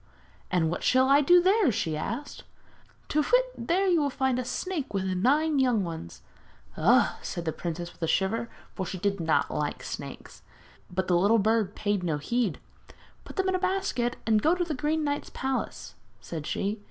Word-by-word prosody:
'And 165 Hz, -3 st, +1 dB
what 175 Hz, -, -3 dB
shall 260 Hz, +1 st, +4 dB
I 280 Hz, +2 st, +6 dB
do 355 Hz, +5 st, +6 dB
there?' 385 Hz, -, +4 dB
she 160 Hz, -6 st, -1 dB
asked. 235 Hz, -, -5 dB, 0.6 s
'Tu 305 Hz, -, +2 dB
whit! -, -, +1 dB
there 375 Hz, +3 st, +2 dB
you 350 Hz, -4 st, +3 dB
will 285 Hz, -, +1 dB
find 265 Hz, -1 st, 0 dB
a -, -, -1 dB
snake 295 Hz, -, -4 dB
with 195 Hz, -, 0 dB
nine 275 Hz, +11 st, +2 dB
young 245 Hz, -6 st, +3 dB
ones.' 160 Hz, -, -7 dB, 0.5 s
'Ugh!' -, -, +3 dB
answered 170 Hz, -, -5 dB
the 160 Hz, -, 0 dB
princess 170 Hz, +1 st, -5 dB
with -, -, -26 dB
a 165 Hz, -, 0 dB
shiver, 225 Hz, +7 st, 0 dB, 0.2 s
for 190 Hz, -, -3 dB
she 185 Hz, +1 st, -5 dB
did 200 Hz, +2 st, -1 dB
not 160 Hz, -1 st, +1 dB
like -, -, -3 dB
snakes. -, -, -8 dB, 0.5 s
But 185 Hz, +1 st, -2 dB
the 180 Hz, -, +3 dB
little 200 Hz, +6 st, +4 dB
bird 215 Hz, -1 st, +1 dB
paid 205 Hz, -2 st, 0 dB
no 165 Hz, -4 st, -1 dB
heed. 220 Hz, +4 st, -1 dB, 0.7 s
'Put -, -, -10 dB
them 380 Hz, -1 st, 0 dB
in -, -, +1 dB
a 370 Hz, -, +1 dB
basket 370 Hz, -11 st, 0 dB
and 220 Hz, -1 st, +3 dB
go 325 Hz, +8 st, +3 dB
to 360 Hz, -, 0 dB
the 335 Hz, -3 st, -3 dB
Green 300 Hz, +3 st, 0 dB
Knight's 290 Hz, 0 st, -2 dB
palace,' 265 Hz, 0 st, -3 dB, 0.3 s
said 155 Hz, -3 st, -6 dB
she. 205 Hz, +2 st, -2 dB
235 Hz, 190 wpm, -27 LUFS, 185-300 Hz, 0.7 s, I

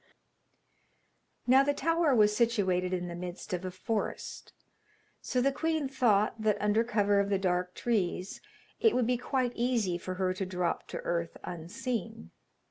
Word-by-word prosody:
Now 260 Hz, +2 st, +6 dB
the 285 Hz, +1 st, +1 dB
tower 330 Hz, -2 st, +2 dB
was 210 Hz, -2 st, +4 dB
situated 195 Hz, -6 st, +1 dB
in 180 Hz, -1 st, -2 dB
the 175 Hz, -, -5 dB
midst 175 Hz, +1 st, -6 dB
of 180 Hz, 0 st, -2 dB
a 185 Hz, -, -3 dB
forest, 195 Hz, +4 st, -4 dB, 0.7 s
so 250 Hz, -, 0 dB
the 275 Hz, +2 st, +3 dB
queen 315 Hz, 0 st, -1 dB
thought 225 Hz, -5 st, +2 dB
that, 215 Hz, -1 st, +2 dB
under 210 Hz, +2 st, +2 dB
cover 205 Hz, -3 st, +2 dB
of 200 Hz, 0 st, +1 dB
the 200 Hz, -, +2 dB
dark 180 Hz, -1 st, -1 dB
trees, 195 Hz, -5 st, -1 dB, 0.4 s
it 450 Hz, -, +4 dB
would 250 Hz, -, +2 dB
be 250 Hz, +1 st, +1 dB
quite 250 Hz, 0 st, -1 dB
easy 230 Hz, -8 st, 0 dB
for 185 Hz, +1 st, -5 dB
her 185 Hz, 0 st, 0 dB
to 190 Hz, +1 st, -3 dB
drop 180 Hz, -2 st, -2 dB
to -, -, -5 dB
earth 170 Hz, -1 st, -2 dB
unseen. 175 Hz, -, -5 dB
210 Hz, 160 wpm, -30 LUFS, 180-245 Hz, 0.7 s, Now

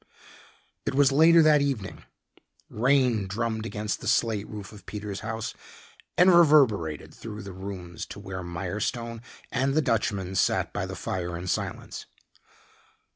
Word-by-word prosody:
It -, -, -2 dB
was 140 Hz, -1 st, +5 dB
later 160 Hz, +3 st, +6 dB
that 150 Hz, -2 st, +5 dB
evening. 130 Hz, -9 st, -3 dB, 0.7 s
Rain 125 Hz, -3 st, +2 dB
drummed 110 Hz, +2 st, -2 dB
against 105 Hz, -1 st, -3 dB
the 115 Hz, -, -6 dB
slate 110 Hz, -2 st, +1 dB
roof 105 Hz, -2 st, -8 dB
of 100 Hz, -3 st, -14 dB
Peter's 105 Hz, -1 st, -5 dB
house 110 Hz, +1 st, -4 dB, 0.6 s
and 180 Hz, +1 st, +7 dB
reverberated 130 Hz, -, +4 dB
through 105 Hz, -2 st, -8 dB
the 100 Hz, -1 st, -8 dB
rooms 95 Hz, -3 st, -7 dB
to -, -, -9 dB
where 95 Hz, -1 st, -6 dB
Mirestone 105 Hz, +7 st, -4 dB, 0.3 s
and 135 Hz, +2 st, +1 dB
the -, -, +5 dB
Dutchman 100 Hz, -6 st, 0 dB
sat 95 Hz, -, +1 dB
by -, -, -2 dB
the -, -, -6 dB
fire 90 Hz, -2 st, -3 dB
in 90 Hz, -, -7 dB
silence. 95 Hz, -, -4 dB
110 Hz, 140 wpm, -27 LUFS, 95-130 Hz, 0.7 s, and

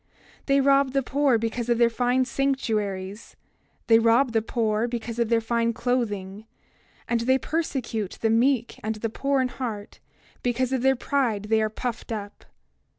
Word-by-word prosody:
28:13 -, -, -43 dB, 0.4 s
They 275 Hz, 0 st, +4 dB
rob 275 Hz, 0 st, +4 dB
the 275 Hz, -1 st, +1 dB
poor 275 Hz, -1 st, +2 dB
because 230 Hz, +1 st, -3 dB
of 235 Hz, -, +3 dB
their 235 Hz, 0 st, +4 dB
fine 250 Hz, +2 st, +1 dB
sanctuaries; 215 Hz, -7 st, -2 dB, 0.5 s
they 225 Hz, -1 st, +6 dB
rob 230 Hz, +3 st, +3 dB
the 225 Hz, -1 st, +2 dB
poor 220 Hz, 0 st, 0 dB
because 235 Hz, -1 st, -5 dB
of 235 Hz, -2 st, +1 dB
their 230 Hz, -1 st, +3 dB
fine 230 Hz, +1 st, 0 dB
clothing; 215 Hz, -4 st, -2 dB, 0.6 s
and 235 Hz, -, +1 dB
they 260 Hz, +3 st, +3 dB
persecute 255 Hz, -, -3 dB
the 225 Hz, -, +1 dB
meek 240 Hz, +1 st, +1 dB
and 220 Hz, +1 st, -2 dB
the 215 Hz, +1 st, -4 dB
poor 275 Hz, +2 st, 0 dB
in 255 Hz, -, 0 dB
heart, 220 Hz, -6 st, -6 dB, 0.4 s
because 250 Hz, +1 st, 0 dB
in 260 Hz, -, 0 dB
their 265 Hz, +1 st, +3 dB
pride 245 Hz, -5 st, 0 dB
they 220 Hz, 0 st, +3 dB
are 215 Hz, -, +1 dB
puffed 235 Hz, +1 st, -5 dB
up. 205 Hz, -2 st, -6 dB
235 Hz, 170 wpm, -25 LUFS, 220-260 Hz, 0.6 s, they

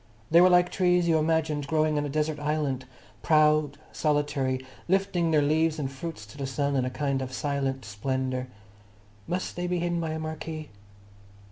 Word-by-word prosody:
They 170 Hz, +2 st, +7 dB
were 180 Hz, -, +7 dB
like 180 Hz, 0 st, +4 dB
trees 180 Hz, -2 st, +2 dB
you 160 Hz, -1 st, +4 dB
imagined 155 Hz, -2 st, 0 dB
growing 155 Hz, 0 st, +2 dB
on 145 Hz, -, -1 dB
a -, -, -5 dB
desert 150 Hz, +1 st, -1 dB
island, 145 Hz, -3 st, -1 dB, 0.4 s
proud, 155 Hz, -2 st, +3 dB
solitary, 145 Hz, -4 st, 0 dB, 0.2 s
lifting 185 Hz, -2 st, +1 dB
their 155 Hz, -2 st, +3 dB
leaves 160 Hz, +2 st, +2 dB
and 135 Hz, -3 st, -3 dB
fruits 135 Hz, -4 st, -7 dB
to 105 Hz, +7 st, -14 dB
the 135 Hz, -, -2 dB
sun 140 Hz, +1 st, -1 dB
in 130 Hz, -2 st, +1 dB
a -, -, -1 dB
kind 140 Hz, 0 st, -1 dB
of 130 Hz, -1 st, -4 dB
silent 135 Hz, -2 st, -2 dB
splendour. 130 Hz, +5 st, -2 dB, 0.8 s
Must 180 Hz, +1 st, -3 dB
they 180 Hz, 0 st, -2 dB
be 180 Hz, 0 st, 0 dB
hidden 175 Hz, 0 st, -1 dB
by 165 Hz, -, -2 dB
a 160 Hz, -, -3 dB
marquee? 155 Hz, 0 st, -5 dB
150 Hz, 175 wpm, -27 LUFS, 135-165 Hz, 0.8 s, They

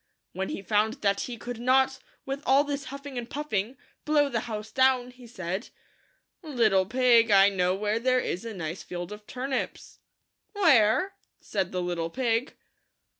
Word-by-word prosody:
When 190 Hz, 0 st, -3 dB
he 195 Hz, -, -5 dB
found 220 Hz, +5 st, 0 dB
that 200 Hz, -1 st, +2 dB
he 240 Hz, -2 st, -5 dB
could 240 Hz, 0 st, -7 dB
not, 265 Hz, +2 st, +3 dB, 0.3 s
with 270 Hz, +1 st, -4 dB
all 270 Hz, +2 st, +4 dB
his 285 Hz, -1 st, -4 dB
huffing 275 Hz, -1 st, -6 dB
and 235 Hz, 0 st, -8 dB
puffing, 255 Hz, -5 st, -3 dB, 0.3 s
blow 295 Hz, -1 st, +3 dB
the 235 Hz, -4 st, -1 dB
house 215 Hz, 0 st, -5 dB
down, 260 Hz, 0 st, +3 dB
he 250 Hz, -1 st, -15 dB
said, 185 Hz, -3 st, -5 dB, 0.4 s
" -, -, -45 dB
Little 225 Hz, -, +2 dB
pig, 240 Hz, -1 st, +4 dB
I 200 Hz, -1 st, +7 dB
know 185 Hz, -2 st, +1 dB
where 210 Hz, +2 st, -1 dB
there 255 Hz, +1 st, +2 dB
is 185 Hz, -5 st, -3 dB
a 230 Hz, -, -5 dB
nice 165 Hz, 0 st, -5 dB
field 175 Hz, +1 st, -6 dB
of 210 Hz, 0 st, -10 dB
turnips." 260 Hz, +1 st, -4 dB, 0.5 s
"Where?" 330 Hz, -, +4 dB, 0.3 s
said 190 Hz, -3 st, -2 dB
the 180 Hz, -1 st, -2 dB
little 170 Hz, -2 st, -2 dB
pig. 235 Hz, +3 st, -1 dB
230 Hz, 170 wpm, -27 LUFS, 200-265 Hz, 0.5 s, I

